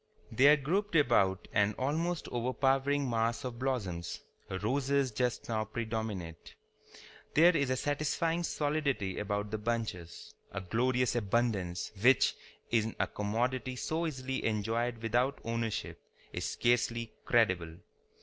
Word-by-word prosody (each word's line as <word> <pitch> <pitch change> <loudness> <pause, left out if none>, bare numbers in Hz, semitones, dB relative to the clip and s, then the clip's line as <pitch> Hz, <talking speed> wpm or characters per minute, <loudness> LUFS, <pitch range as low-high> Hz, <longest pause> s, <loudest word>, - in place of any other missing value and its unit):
They 130 +5 +5
are 150 +1 +8
grouped 180 +7 -1
about 115 - +3
an 105 +1 +2
almost 160 +6 -1
overpowering 135 +3 +1
mass 115 -1 0
of 125 -2 -5
blooms. 100 -11 -2 0.3
Roses 130 +7 0
just 125 +2 -1
now 110 -2 0
predominate. 110 -6 -5 0.8
There 170 +3 +7
is 140 -4 +1
a 130 - +2
satisfying 155 +4 0
solidity 145 - -1
about 105 0 -2
the 110 - -2
bunches, 105 -7 -4 0.2
a - - -3
glorious 125 +7 +1
abundance 105 -5 0
which, 130 +3 +5 0.4
in 115 -1 +1
a - - +3
commodity 125 +5 -2
so 160 +6 -1
easily 130 -3 -3
enjoyed 115 +2 -1
without 120 +5 +1
ownership, 115 -1 -3 0.3
is - - -3
scarcely 115 -1 0
credible. 90 -8 +2
120 Hz, 120 wpm, -32 LUFS, 110-135 Hz, 0.8 s, are